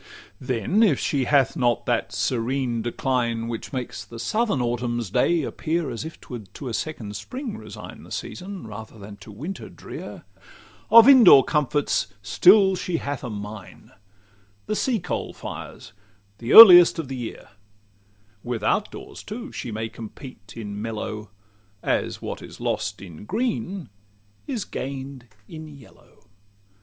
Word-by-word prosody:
LXXVII - - -12
Then, 130 - +1
if 190 - +4
she 135 -3 0
hath 140 -1 +3
not 120 -6 +1
that - - 0
serene 125 0 -1
decline 120 -1 -1
Which 115 -1 -6
makes 130 -3 -5
the 115 - -11
southern 205 - 0
autumn's 120 -3 -2
day 170 +6 +2
appear 160 +2 -2
As 115 - -5
if 160 +1 -9
't - - -18
would 110 -6 -8
to 135 - -6
a - - -5
second 110 -6 -4
spring 240 - -6
resign - - -10
The - - -15
season, 190 0 -6
rather 110 +1 -9
than 100 0 -11
to 100 +2 -13
winter 155 - -7
drear, - - -9 0.7
Of 230 +1 +9
in 265 -3 +9
door 135 -10 +9
comforts 150 -5 0 0.2
still 190 - +5
she 180 -1 -2
hath 145 -3 -4
a 125 - -4
mine, 105 -3 -9 0.7
The 215 - -2
sea 240 0 0
coal 180 - -4
fires 100 - -9 0.5
the 115 - -4
"earliest 180 -6 +11
of 160 -4 -4
the 135 - -5
year;" 120 -2 -7 0.9
Without 120 - 0
doors, - - -10
too, 235 +5 -7
she - - -6
may 110 +1 -3
compete 110 -2 -11
in 105 -3 -6
mellow, 110 -1 -5 0.5
As - - -1
what - - -5
is - - -11
lost - - -3
in 90 +1 -11
green 200 - -3 0.6
is 250 -8 -3
gain'd 135 -1 -6 0.2
in 155 -1 -9
yellow. 140 -7 -17
130 Hz, 150 wpm, -24 LUFS, 115-175 Hz, 0.9 s, earliest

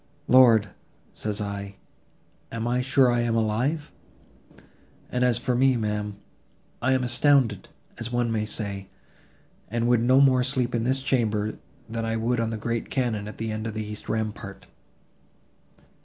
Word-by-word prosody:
Lord, 115 -5 +6 0.4
says 105 -1 -3
I—am 100 +3 -8
I 125 +1 +1
sure 130 -1 +4
I 120 - +1
am 120 -1 0
alive? 120 +8 0 1.2
And 125 0 0
as 125 -2 +3
for 125 +1 -1
me, 130 0 +3
ma'am, 105 -2 -2 0.7
I 130 +2 +2
am 130 - +2
all - - -1
astounded, 120 -4 +2 0.3
as 115 +1 -4
one 120 -1 0
may 110 -1 0
say, 100 -3 -5 0.8
and 120 +2 0
would 120 -2 +3
no 130 +3 +5
more 130 -2 +5
sleep 130 -1 -1
in 115 -1 0
this 130 +1 0
chamber, 110 -5 0 0.3
than 115 0 -4
I 115 0 -1
would 115 +2 0
on 115 -1 0
the 115 - -3
great 115 +1 -3
cannon 115 -6 -1
at 105 - -9
the 110 0 -3
end 110 +1 -3
of 110 - -5
the 110 0 -3
east 105 0 -8
rampart." 105 -2 -4
115 Hz, 160 wpm, -25 LUFS, 110-125 Hz, 1.2 s, Lord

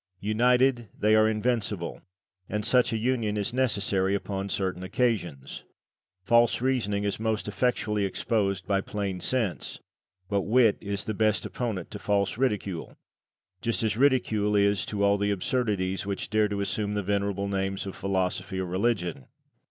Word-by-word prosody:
United 120 +3 +2
they 105 +1 +3
are 110 0 +5
invincible, 110 -5 -1 0.5
and 105 0 -2
such 125 -1 +3
a 115 - 0
union 110 -2 0
is 105 +3 -2
necessary 100 -6 +1
upon 100 0 -3
certain 95 -2 -2
occasions. 95 - -2 0.6
False 115 +3 +4
Reasoning 115 -6 0
is 100 0 -1
most 110 -1 -1
effectually 105 -1 0
exposed 100 0 -1
by 100 -1 +1
Plain 100 -3 -3
Sense; 115 -3 -2 0.5
but 100 -1 +1
Wit 115 +1 +3
is 100 -1 -3
the 110 - -3
best 105 -3 +1
opponent 110 -8 -4
to 105 - -6
False 100 -1 0
Ridicule, 105 -8 -2 0.7
as 115 -1 0
Just 110 -2 0
Ridicule 110 -6 +2
is 100 -1 +2
to 100 -1 -1
all 100 0 +3
the 100 0 +1
absurdities 100 -2 -1
which 100 +2 -4
dare 110 -1 +3
to 100 -1 -3
assume 105 +1 -2
the 105 - -1
venerable 100 0 -1
names 95 0 -2
of 95 - -6
Philosophy 95 0 -2
or 95 - -1
Religion. 90 - -1
105 Hz, 150 wpm, -27 LUFS, 95-115 Hz, 0.7 s, are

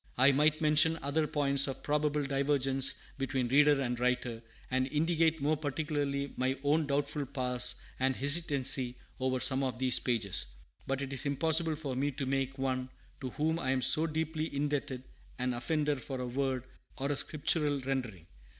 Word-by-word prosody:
I 130 +3 +6
might 150 +3 +2
mention 155 +1 +4
other 150 +2 0
points 140 -2 +3
of 135 - -6
probable 150 0 0
divergence 135 -1 +1 0.2
between 135 -2 -2
reader 145 +2 +4
and 125 -3 -2
writer, 125 -2 -1 0.3
and 130 0 +1
indicate 160 +1 +1
more 155 +2 +2
particularly 145 -2 -3
my 130 +1 -1
own 150 +1 +1
doubtful 145 0 -1
parse 125 -2 +3 0.2
and 130 0 +1
hesitancy 135 -4 +3 0.2
over 130 0 -1
some 130 +2 +2
of 130 -3 -3
these 130 0 +3
pages. 110 - +1 0.4
But 135 +1 -2
it 135 0 -6
is 135 - 0
impossible 160 +3 +2
for 145 -4 -5
me 140 +3 0
to 135 +1 -4
make 135 0 -2
one 130 -1 -2 0.3
to 130 - -5
whom 160 +5 -1
I 130 - -2
am 130 -1 0
so 160 +2 +5
deeply 160 0 -2
indebted 145 -2 -2 0.3
an 125 0 -1
offender 145 +4 -1
for 130 +1 -6
a 125 - -3
word 130 0 -2 0.3
or 140 +1 -2
a - - 0
Scriptural 150 0 +1
rendering. 125 -10 -4
140 Hz, 170 wpm, -31 LUFS, 130-150 Hz, 0.4 s, I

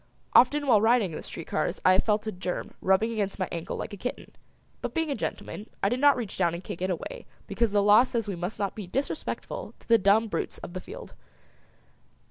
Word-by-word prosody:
Often 290 +4 +5
while 225 -6 +5
riding 225 -4 +3
in - - -6
the - - -6
street - - -8
cars - - -1
I 185 - +7
have 185 - +3
felt 215 0 +1
a 215 - -2
germ 180 -1 -4
rubbing 190 +4 +3
against 205 -3 -2
my 185 - -1
ankle 170 +2 -4
like - - -5
a - - -6
kitten, 250 +6 -5 0.5
but - - -4
being 325 -2 0
a - - 0
gentleman, 215 -1 -5
I 200 - +4
did 245 +3 -1
not 285 -1 +5
reach 225 -7 -5
down 170 -2 +2
and 175 - -7
kick 175 - -7
it 185 - 0
away 340 - -5 0.2
because 230 -3 0
the 205 -1 +3
law 210 +2 +7
says 235 -3 -1
we 200 - -2
must 180 +4 -4
not 200 -2 -1
be 210 -4 -7
disrespectful 270 +10 -4
to - - -23
the 230 -1 +6
dumb 205 +3 +4
brutes 170 -6 -3
of 175 - -9
the 185 - -5
field. 485 +4 -10
210 Hz, 235 wpm, -27 LUFS, 185-240 Hz, 0.5 s, I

